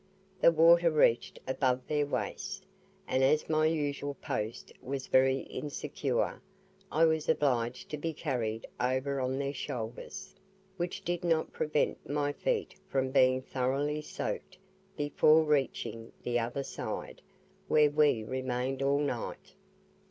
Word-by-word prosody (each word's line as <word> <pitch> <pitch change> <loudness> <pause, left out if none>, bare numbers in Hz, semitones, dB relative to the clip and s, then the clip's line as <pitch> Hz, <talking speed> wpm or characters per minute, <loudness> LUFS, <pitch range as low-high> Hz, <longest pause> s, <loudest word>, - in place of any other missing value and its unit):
The 170 - +7
water 170 +1 +6
reached 150 -7 +2
above 130 -1 +1
their 150 -1 +1
waists, - - -3 0.5
and 130 - +2
as 150 +3 +3
my 155 0 +3
usual 145 -3 -1
post 110 0 -4
was 135 0 -4
very 130 0 +3
insecure, 145 -1 -3 0.5
I 160 +3 +4
was 160 -1 +1
obliged 125 -6 +1
to 150 - -2
be 165 +2 -2
carried 120 -8 -2
over 130 +2 0
on 130 +1 -1
their 140 0 -2
shoulders, 125 +8 -6 0.4
which 175 -1 -4
did 175 0 -1
not 165 -2 +1
prevent 150 -1 -1
my 145 0 0
feet 480 - -1
from 130 -1 0
being 130 -1 +4
thoroughly 140 +4 -1
soaked 185 +4 -5 0.4
before 155 +1 +4
reaching 135 -6 -1
the 120 0 +1
other 120 +4 -2
side, - - -6 0.5
where 150 -1 +5
we 145 -7 +3
remained 130 +2 -2
all 140 +1 +2
night. 135 -5 -4
140 Hz, 130 wpm, -31 LUFS, 130-155 Hz, 0.5 s, The